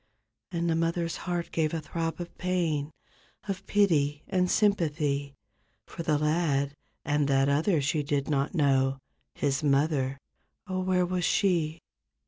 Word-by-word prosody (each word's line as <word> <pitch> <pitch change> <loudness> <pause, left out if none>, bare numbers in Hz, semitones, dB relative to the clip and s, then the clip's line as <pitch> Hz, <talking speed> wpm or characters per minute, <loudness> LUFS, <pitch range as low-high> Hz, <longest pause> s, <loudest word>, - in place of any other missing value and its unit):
And 170 -1 -1
the 165 - +2
mother's 165 0 0
heart 175 -1 -2
gave 160 0 0
a - - -1
throb 165 +2 -3
of 175 -1 -7
pain. 170 -5 0 0.6
Of 195 -1 -4
pity 150 -8 +2
and 180 -1 +1
sympathy 150 -9 +1 0.5
For - - -7
the 155 -3 +1
lad, 150 -2 +1 0.3
and 145 -1 +1
that 135 -1 +3
other 155 +3 +2
she 150 +2 +1
did 140 -1 -1
not 140 +2 0
know. 135 -3 +2 0.4
His 140 0 0
mother—oh, 140 +6 -1
where 185 -1 +2
was 180 0 -1
she? 165 -4 +1
155 Hz, 135 wpm, -28 LUFS, 140-175 Hz, 0.6 s, that